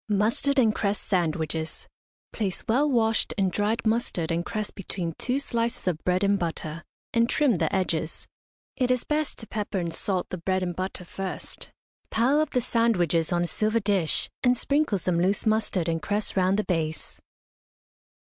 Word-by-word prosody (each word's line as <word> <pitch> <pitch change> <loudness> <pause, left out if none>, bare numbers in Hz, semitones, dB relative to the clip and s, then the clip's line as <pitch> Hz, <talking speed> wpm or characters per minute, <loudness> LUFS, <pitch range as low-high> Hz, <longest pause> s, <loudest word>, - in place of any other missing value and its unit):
MUSTARD 220 +7 +2
AND 225 -5 +5
CRESS 205 -1 0
SANDWICHES. 160 -3 -1 0.5
Place 195 -5 -1
well 275 +7 +3
washed 225 -4 +2
and 190 -2 +2
dried 210 +5 0
mustard 220 -7 0
and 170 +1 0
cress 215 +2 -3
between 180 -3 -4
two 255 +2 +1
slices 235 -6 -2
of 165 -3 -1
bread 180 +1 +1
and 200 0 +3
butter, 165 -1 -3 0.3
and 230 0 +3
trim 280 - +3
the - - 0
edges. 165 -4 -1 0.5
It 250 -2 +1
is 250 -1 +2
best 305 0 -1
to 225 - -8
pepper 210 -1 -3
and 170 -2 -2
salt 185 +2 -1
the 185 - -4
bread 185 +2 0
and 175 -1 -2
butter 185 0 -4
first. 190 +1 -5 0.4
Pile 260 +6 +3
up 310 - 0
the 250 - +1
sandwiches 180 -9 +2
on 175 0 +2
a - - -1
silver 215 +5 +1
dish, 200 -6 +2
and 250 -1 +3
sprinkle 280 -4 +1
some 175 -1 0
loose 195 +5 +1
mustard 215 -5 +1
and 165 -1 0
cress 205 +1 -1
round 190 +1 +3
the 210 - +1
base. 160 -4 -2
200 Hz, 175 wpm, -26 LUFS, 175-230 Hz, 0.5 s, AND